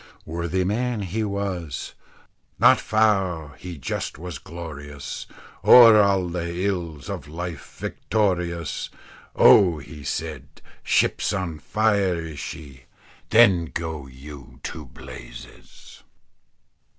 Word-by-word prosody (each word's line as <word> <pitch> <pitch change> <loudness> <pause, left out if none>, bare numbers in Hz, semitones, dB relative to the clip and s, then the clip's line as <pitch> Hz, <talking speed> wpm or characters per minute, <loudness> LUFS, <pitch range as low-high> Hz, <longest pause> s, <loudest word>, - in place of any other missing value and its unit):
Worthy 85 +3 -2
man, 110 +3 -1
he 100 +5 -2
was 95 -8 -4 0.6
"Not - - +6
fou, 95 -8 +1
he 90 -2 -7
just 70 - -4
was 85 -2 -7
glorious, 75 -4 -8 0.4
O'er 115 -3 +9
a' 95 -3 +2
the 85 +1 -3
ills 85 -7 -3
of - - -6
life 85 0 -7
victorious." 90 -6 -1 0.5
"Oh!" 90 -5 +6
he 75 +1 -10
said; 70 -1 -4 0.3
"ship's - - +1
on 85 -5 -3
fire, 100 -2 +1
is 80 -3 -6
she. 70 -1 -8 0.4
Then 100 -7 +5
go 80 -3 -5
you 65 +1 -12
to 75 -4 -6
blazes." - - -12
85 Hz, 105 wpm, -24 LUFS, 75-95 Hz, 0.6 s, O'er